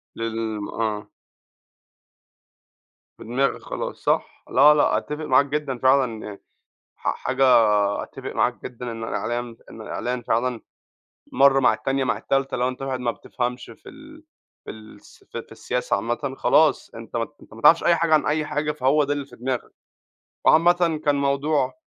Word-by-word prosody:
للم 110 -2 -4
آه. 110 -2 -3 2.1
في - - -11
دماغك 130 +5 -1
خلاص، - - -5
صح؟ - - -1
لا 145 +3 +6
لأ، 150 - +2
أتفق 150 +1 -5
معاك 130 +1 +4
جدًا 140 -2 -3
فعلًا 130 -3 +2
يعني، 100 -2 -9 0.6
ح - - -2
حاجة 130 +1 0 0.6
أتفق - - -8
معاك 120 +2 0
جدًا 125 -1 -6
إن 115 0 -6
الإعلام 120 +1 -3
إن 110 - -10
الإعلان 125 +3 -4
فعلًا 120 +1 -1 0.7
مرّة 135 0 +5
مع 120 -4 +4
التانية 135 +3 -1
مع 125 - 0
التالتة، 135 0 -1
لو 125 0 +1
أنت 130 +1 -6
واحد 135 -1 -3
ما 120 -1 0
بتفهمش 125 +1 -4
في 115 - -15
ال 305 +2 -14 0.4
في - - -8
الس 110 0 -14
في - - -7
في - - -17
السياسة 125 -4 -2
عامةً، 120 +6 -3
خلاص 155 -1 +3
أنت 115 +1 -8
ما 115 - 0
ت 145 - -19
أنت - - -16
ما 115 - -12
تعرفش 165 - +6
أي 170 - +4
حاجة 165 -1 +2
عن 155 - +3
أي 155 0 0
حاجة 150 0 -1
فهو 145 +1 +2
ده 145 - -2
اللي 145 -1 -3
في - - -16
دماغك، 125 0 -4 0.7
وعامةً 170 -1 +4
كان 145 - +3
موضوع 140 -1 0
130 Hz, 165 wpm, -23 LUFS, 120-145 Hz, 2.1 s, لا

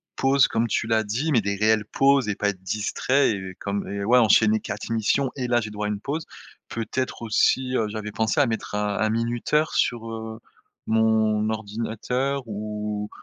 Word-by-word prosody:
pauses, 135 -1 +4
comme 115 +1 0
tu 110 - 0
l'as 110 0 +2
dit 130 +10 -2
mais 120 - +4
des 100 0 -1
réelles 110 +1 +2
pauses 135 -4 +3
et 105 - -1
pas 105 0 0
être 95 -2 -6
distrait 110 +7 +1
et 95 -2 -5
comme 100 0 -3
et 100 0 -3
ouais 125 +3 +5
enchaîner 110 -1 +4
4 105 +2 -6
missions 115 +4 +1
et 130 -3 -3
là 120 -1 +3
j'ai 105 -1 -6
droit 105 0 -3
à - - -2
une 105 -1 -3
pause, 155 +7 -4 0.4
peut-être 115 +2 -3
aussi, 130 +3 +2
heu, 110 -3 +1
j'avais 105 0 -5
pensé 110 +5 0
à 145 - +5
mettre 110 -3 -3
un 105 -1 -1
un 110 - +2
minuteur 120 +7 0
sur, 115 -2 0
heu, 110 0 -6 0.5
mon 110 -1 +2
ordinateur 115 +5 -2
ou 105 -1 -4
110 Hz, 190 wpm, -24 LUFS, 105-125 Hz, 0.5 s, ouais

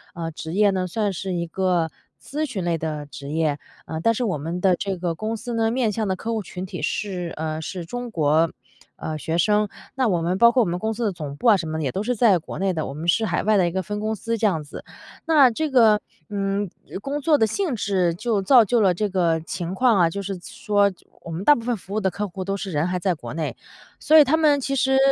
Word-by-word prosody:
呃 165 -1 -4
职 160 +1 -7
业 205 +1 +4
呢， 185 -1 -1
算 205 +2 -1
是 190 +1 -4
一 170 -1 -1
个 175 -2 0 0.3
咨 305 +1 -4
询 200 -7 -3
类 170 -1 +1
的 150 -2 -4
职 140 0 -9
业， 155 -1 0 0.3
呃 160 - -5
但 230 - +4
是 250 - -1
我 195 -9 0
们 165 +4 -4
的 185 0 +3
这 195 +1 -3
个 175 -1 -2
公 215 +6 -3
司 240 +2 -6
呢， 225 -1 +1
面 235 -2 +1
向 215 +1 -2
的 190 - 0
客 225 +5 -4
户 220 - -1
群 185 -1 -7
体 185 - -7
是， 180 -4 -2
呃 155 0 -3
是 175 +2 -5
中 245 +7 -5
国 160 -3 +2 0.4
呃 155 - -5
学 160 +2 -2
生， 210 +4 +2 0.3
那 260 -2 +2
我 175 -5 +1
们 180 +3 0
包 235 0 +7
括 250 -1 +3
我 - - -2
们 175 +1 -2
公 220 +3 -1
司 235 - -2
的 210 - +1
总 150 -6 -6
部 - - -9
啊 220 - +8
什 170 -4 -3
么 155 - -3
的， 160 - -2
也 135 - -1
都 195 - -2
在 210 -6 +4
国 160 - -8
内 190 -1 +1
的， 155 -3 -2
我 135 - -6
们 160 +3 -5
是 220 +6 +3
海 - - 0
外 215 0 +3
的 180 -3 +3
一 - - -2
个 190 +1 -2
分 210 0 -4
公 220 +1 -1
司， 230 +2 -3
这 215 - +3
样 160 -6 -1
子。 145 - -10 0.4
那 305 -5 +6
这 310 +6 -2
个， 225 -5 +5 0.3
嗯 200 -1 -1 0.3
工 285 +5 -3
作 295 -4 +3
性 305 - -1
质 190 -5 +1
就 210 +3 -1
造 235 +4 +6
就 235 +3 +2
了 190 -3 +4
这 210 +4 -1
个 170 -4 +1
情 170 +3 -5
况 235 0 +3
啊， 170 -2 +4
就 200 +4 -4
是 195 -1 -4
说 205 +2 +1 0.3
我 170 - -9
们 165 +4 -4
大 295 - +7
部 235 - -5
分 240 -1 -1
服 195 +1 -10
务 215 - +1
的 190 - +2
客 205 +3 -3
户 185 0 -6
都 195 +1 -2
是 195 -1 -5
人 150 -2 0
都 - - 0
还 180 0 -1
在 185 -1 0
国 155 - -8
内， 160 -2 -3 0.4
所 315 - +5
以 - - +9
他 285 +4 +3
们 300 -3 +4
其 275 +1 -2
实， 265 0 +2
195 Hz, 285 characters per minute, -23 LUFS, 170-225 Hz, 0.4 s, 以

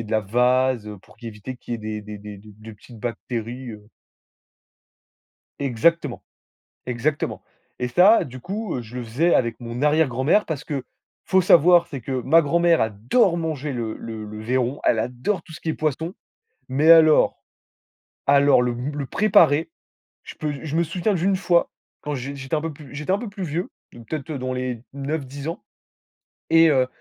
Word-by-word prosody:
ait 115 - -4
de 105 - -11
la 110 -1 +2
vase, 125 +1 +1
pour - - -20
q 120 - -11
éviter 115 +4 -7
qu'il 120 - -8
y - - +1
ait - - -12
des 110 0 -5
des 105 0 -8
des 105 0 -9
des 105 +1 -15
des 110 +1 -12
petites 115 +2 -15
bactéries, 120 +1 -5
heu 105 -1 -12 1.7
Exactement. 140 +2 +1 0.6
Exactement, 125 +4 -2 0.3
et 125 - -1
ça 185 - +5
du 130 -1 -10
coup, 195 - -4
je 115 +2 -11
le 125 - -4
faisais 150 +10 +1
avec 115 -2 -1
mon 120 +2 -6
arrière-grand-mère, 150 - +3
parce 150 -3 -4
que 140 -3 -3 0.4
faut 190 - +3
savoir 175 0 +6
c'est 135 - -7
que 125 - -9
ma 165 +6 +5
grand-mère 170 +2 +3
adore 115 - +2
manger 150 -3 -3
le 115 -3 -4
le 110 -2 -7
le 105 +1 -8
vairon, 125 +3 -1
elle 115 - +2
adore 125 - -2
tout 160 - -14
ce - - -10
qui - - -5
est 160 - 0
poisson, 155 +3 -2 0.6
mais 145 +5 +2
alors 160 -2 +6 0.9
alors 140 -2 +5
le 125 -1 0
b 125 +5 -4
le 145 -1 -3
préparer, 165 - +3 0.5
je - - -11
peux 150 -2 -3
je 155 0 -3
me 170 - +3
souviens 180 +6 -1
d'une 190 +2 +1
fois, 175 -2 +2 0.3
quand 150 - -3
j 140 +2 -5
j'étais 135 +2 -4
un 155 - +1
peu 165 +1 -4
plus 140 -2 -13
j'étais 150 +4 -4
un 195 - +3
peu 235 - -6
plus 200 -1 -8
vieux. 170 +1 -3 0.2
Peut-être 135 +6 -7
dans 130 -1 -3
les 125 -2 -4
9-10 140 +1 -5
ans, 165 - -6 0.9
et 165 0 +7
heu 130 -3 +3
135 Hz, 185 wpm, -23 LUFS, 120-160 Hz, 1.7 s, et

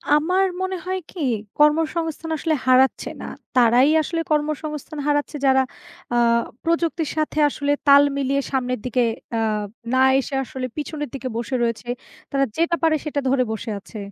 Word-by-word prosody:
আমার 365 +6 +2 0.2
মনে 375 0 -1
হয় 375 0 -1
কি 360 - -10 0.4
কর্মসংস্থান 320 +1 +1
আসলে 315 0 0
হারাচ্ছে 255 +1 +4
না। - - -6 0.3
তারাই 245 +3 +5
আসলে 330 +1 -2
কর্মসংস্থান 300 0 -2
হারাচ্ছে 290 +1 0
যারা 265 0 +5 0.5
আ - - +1 0.5
প্রযুক্তির 335 -1 0
সাথে 310 0 0
আসলে 285 0 -2 0.2
তাল 280 0 +8
মিলিয়ে 275 0 +1
সামনের 250 -3 -1
দিকে 250 0 +1 0.3
আ - - +1 0.6
না 260 - +3 0.2
এসে 275 - -5
আসলে 255 0 -5
পিছনের 295 -2 -4
দিকে 260 -1 -5
বসে 240 +3 -3
রয়েছে। 230 +1 -2 0.4
তারা 275 0 +2
যেটা 340 +1 +2
পারে 320 -1 +4
সেটা 290 -1 -1
ধরে 260 -1 +3
বসে 220 +1 -5
আছে। 215 - -12
290 Hz, 155 wpm, -22 LUFS, 260-320 Hz, 0.6 s, তাল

